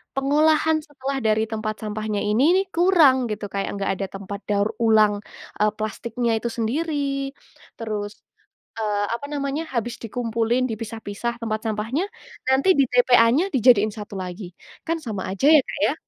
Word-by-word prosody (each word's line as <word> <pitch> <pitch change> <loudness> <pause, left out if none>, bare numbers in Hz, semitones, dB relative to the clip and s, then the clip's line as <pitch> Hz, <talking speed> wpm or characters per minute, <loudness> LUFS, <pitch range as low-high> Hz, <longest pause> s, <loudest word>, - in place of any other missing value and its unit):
pengolahan 310 +3 +3
setelah 275 -2 -5
dari 220 -1 +2
tempat 215 -1 -3
sampahnya 215 -1 -3
ini 295 - +3
kurang, 320 -8 +4
gitu, 210 -1 -4
kayak 195 0 -2
nggak 200 -1 -1
ada 195 - -1
tempat 200 +1 -7
daur 205 0 +2
ulang, 215 -2 +4 0.4
eee, 210 0 +4
plastiknya 230 +2 -2
itu 235 - -3
sendiri. 275 +2 -1 0.5
Terus, 210 -2 -4 0.6
eee, 210 -2 0
apa 235 +4 -4
namanya, 280 +2 -2
habis 240 0 -2
dikumpulin, 230 +2 0
dipisah-pisah 225 0 -4
tempat 220 -1 -2
sampahnya, 220 - -1 0.4
nanti 265 +7 +3
di 280 - +5
TPA-nya 245 +6 +4
dijadiin 230 -4 +5
satu 210 -1 -8
lagi. 180 0 -7 0.3
Kan 330 +1 0
sama 215 -8 -4
aja, 195 +9 +1
ya, 310 -2 +7
Kak, - - -6
ya. - - 0
230 Hz, 145 wpm, -23 LUFS, 215-275 Hz, 0.6 s, ya